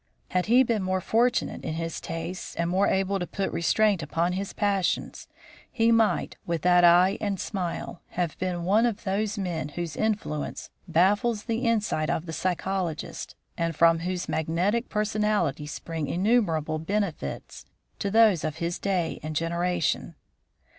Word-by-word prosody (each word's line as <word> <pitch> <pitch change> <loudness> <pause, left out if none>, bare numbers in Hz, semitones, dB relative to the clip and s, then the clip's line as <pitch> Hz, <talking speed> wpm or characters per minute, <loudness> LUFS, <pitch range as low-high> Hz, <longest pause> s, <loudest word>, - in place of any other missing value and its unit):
Had 180 +1 0
he 245 +4 +6
been 230 -4 0
more 185 0 0
fortunate 235 +6 +1
in 155 - -3
his 165 0 -4
tastes 170 +2 -5
or 170 - +2
more 185 +4 +2
able 195 +1 +1
to 175 - -3
put 195 0 -2
restraint 200 +2 +2
upon 165 +4 0
his 195 +1 -3
passions, 200 -3 -1 0.4
he 230 -1 +3
might, 225 -1 +2
with 170 -3 -3
that 180 0 +5
eye 175 +3 +6
and 200 -3 -1
smile, 180 -3 -4 0.2
have 175 -3 0
been 180 -2 -2
one 210 +7 +4
of 225 -4 -4
those 210 +2 -1
men 175 -6 -3
whose 170 +1 -5
influence 210 -9 -2 0.2
baffles 205 +6 +2
the 230 -2 -1
insight 210 -9 +1
of 160 - -1
the 160 - -6
psychologist, 180 -2 -3 0.2
and 165 -1 -1
from 165 +1 +5
whose 180 +1 -3
magnetic 180 +9 0
personality 210 -8 0
spring 160 0 -4
innumerable 170 -7 +1
benefits 200 +1 -3 0.4
to 200 - -1
those 215 -5 +5
of 155 -1 -2
his 170 +1 -3
day 185 -4 -1
and 155 0 -5
generation. 170 +1 -1
180 Hz, 155 wpm, -26 LUFS, 165-210 Hz, 0.4 s, he